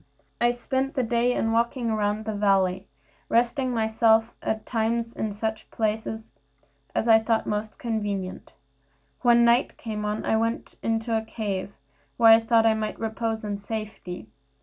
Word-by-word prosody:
I 240 0 +4
spent 265 +4 -2
the 260 - +1
day 235 +1 +1
in 225 -2 0
walking 235 +1 0
about 210 -1 +1
in 215 - -8
the 220 0 -3
valley, 195 -2 +1 0.4
resting 245 +3 +2
myself 225 0 +2
at 220 0 -2
times 230 0 -1
in 220 - -3
such 220 +1 -4
places 220 0 -3 0.6
as 225 - 0
I 225 -1 +7
thought 220 0 0
most 210 +1 -3
convenient. 205 -5 -4 0.7
When 235 -1 +5
night 235 +2 +3
came 215 -2 -5
on 210 +1 -2
I 220 - +2
went 230 +1 -2
into 225 0 0
a 220 - +1
cave, 205 -3 -4 0.4
where 230 -1 +7
I 225 - +7
thought 225 0 +3
I 225 - +5
might 215 -1 -3
repose 225 0 -2
in 205 -1 -3
safety. 205 - -6
220 Hz, 160 wpm, -25 LUFS, 215-235 Hz, 0.7 s, I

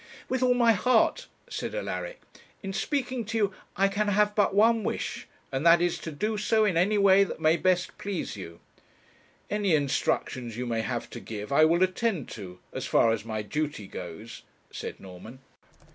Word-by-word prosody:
'With 260 0 -1
all 250 -1 +4
my 235 -2 +5
heart,' 225 +3 +2 0.2
said - - -5
Alaric. - - -4 0.4
'In 195 0 -4
speaking 255 +1 -2
to 225 +2 -3
you 205 -3 +1 0.2
I 195 +1 +4
can 205 +2 -1
have 210 +1 +2
but 205 -2 +2
one 225 +2 +4
wish, - - -3 0.2
and 135 +2 -2
that 170 0 +7
is 175 -1 0
to 165 - -6
do 210 +8 -2
so 220 +1 +2
in 195 -5 +1
any 195 +5 +3
way 200 -1 +6
that 195 - -5
may 155 +1 +4
best 180 0 0
please 200 - -4
you.' 85 -4 -9 0.9
'Any 205 -5 +2
instructions 130 -4 -1
you 125 - -3
may 115 -2 -1
have 120 +1 -3
to 120 - -7
give 105 +1 -7
I 155 +3 +6
will 170 +3 +3
attend 185 - -1
to, 90 -4 -8 0.2
as - - -4
far 115 - +4
as 110 -1 -2
my 110 -2 -3
duty 150 -1 -3
goes,' 95 +5 -8 0.3
said - - -6
Norman. 95 +6 -11
180 Hz, 185 wpm, -27 LUFS, -, 0.9 s, that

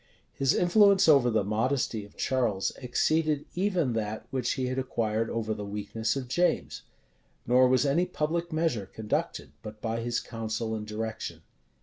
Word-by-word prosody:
His 135 -1 +2
influence 200 +1 +5
over 140 -6 +6
the 110 -3 +2
modesty 110 +2 0
of 105 - -19
Charles 120 -7 0
exceeded 150 +4 +1
even 180 - 0
that 110 -1 -3
which 130 -3 0
he 130 - -2
had 130 +1 -1
acquired 115 -3 -1
over 110 -1 -2
the 105 -1 -6
weakness 105 +3 -2
of 135 -2 -4
James; 175 +8 0 0.6
nor 125 +2 +5
was 130 +2 +3
any 165 +6 +2
public 170 0 -2
measure 155 - 0
conducted 105 +2 -3
but 105 0 -9
by 115 +1 -2
his 120 0 -1
counsel 110 -1 -4
and 105 -1 -4
direction. 110 +1 -5
120 Hz, 155 wpm, -28 LUFS, 110-145 Hz, 0.6 s, over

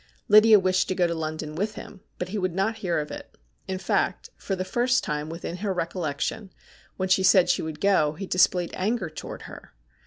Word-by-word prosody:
Lydia 215 0 +7
wished 185 0 +1
to 185 - -1
go 180 - +2
to 170 - 0
London 155 -1 -4
with 205 +7 -2
him, 195 - -10 0.2
but 180 - -4
he 210 +2 -3
would 185 -2 -2
not 220 +4 0
hear 185 -6 -1
of 150 -1 -3
it. - - -10 0.3
In 190 -1 -2
fact, 185 - -1
for 195 - -4
the 185 0 -3
first 245 +5 +1
time 150 +1 -3
within 170 +1 -6
her 200 +1 -2
recollection, 180 +3 -3 0.5
when 185 - -1
she 185 0 +3
said 190 -1 +5
she - - 0
would 160 -1 -6
go, 185 -7 +3
he 190 +5 -6
displayed 180 -1 +2
anger 200 -3 -1
towards - - -8
her. - - -12
185 Hz, 210 wpm, -25 LUFS, 165-200 Hz, 0.5 s, Lydia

